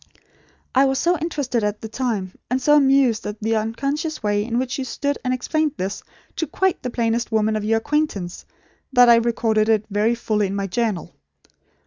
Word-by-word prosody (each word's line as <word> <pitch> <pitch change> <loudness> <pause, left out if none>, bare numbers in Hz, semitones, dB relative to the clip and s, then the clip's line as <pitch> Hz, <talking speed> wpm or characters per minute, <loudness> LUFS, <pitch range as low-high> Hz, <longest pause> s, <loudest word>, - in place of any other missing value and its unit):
"I 270 +1 +5
was 270 0 +1
so 345 +5 +2
interested, 285 -8 -2
at 210 0 -2
the 220 - -5
time; 220 -6 -3 0.2
and 255 - +1
so 295 +3 +4
amused 270 -5 +4
at 210 +1 -6
the 225 +1 0
unconscious 275 +8 -2
way 205 0 +1
in 230 +2 -2
which 255 +2 -2
you - - -1
stood 285 +3 -2
and 255 - 0
explained 300 +4 0
this, 190 +2 -3 0.4
to 325 - -1
quite 380 +5 0
the 250 - -3
plainest 235 0 -1
woman 220 0 +1
of 215 - -2
your 225 +1 +2
acquaintance, 225 - -2 0.5
that 245 -2 +6
I 235 - +8
recorded 225 -2 +1
it 215 -1 +2
very 215 +4 +2
fully 215 -3 0
in 195 - -4
my 200 0 -1
journal. 195 -2 -2
235 Hz, 190 wpm, -22 LUFS, 215-270 Hz, 0.5 s, I